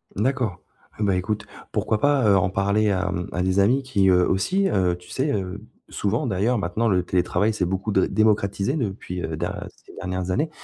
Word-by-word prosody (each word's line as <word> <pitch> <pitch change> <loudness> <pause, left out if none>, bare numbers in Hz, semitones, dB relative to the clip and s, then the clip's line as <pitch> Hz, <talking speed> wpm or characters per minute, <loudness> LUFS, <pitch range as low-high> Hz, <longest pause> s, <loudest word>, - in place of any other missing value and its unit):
D'accord, 115 -3 -1 0.4
eh - - 0
ben, 100 -2 +2
écoute, 100 +3 -2 0.3
pourquoi 110 - 0
pas, 145 -2 +3
heu, 100 - +6
en 90 0 +2
parler 100 +2 +1
à, 95 -1 0
hem, 90 0 -3
à 90 - -1
des 95 +2 +1
amis 125 +7 +3
qui, 100 -7 +1
heu, 90 -1 +4
aussi 190 - +1
heu, 90 - +1
tu 90 - -17
sais, 140 +2 -1
heu 95 -1 -3 0.3
souvent 110 +8 -1
d'ailleurs, 115 +3 +1
maintenant, 100 +5 -1
le 90 -3 +2
télétravail 90 +4 +1
s'est 100 -4 0
beaucoup 95 +4 -2
dré 95 -2 +3
démocratisé 105 +2 +1
depuis, 95 - -4
heu, - - -3
da - - -4 0.2
ces - - -16
dernières 90 -1 -3
années. 155 - 0
100 Hz, 205 wpm, -23 LUFS, 90-110 Hz, 0.4 s, heu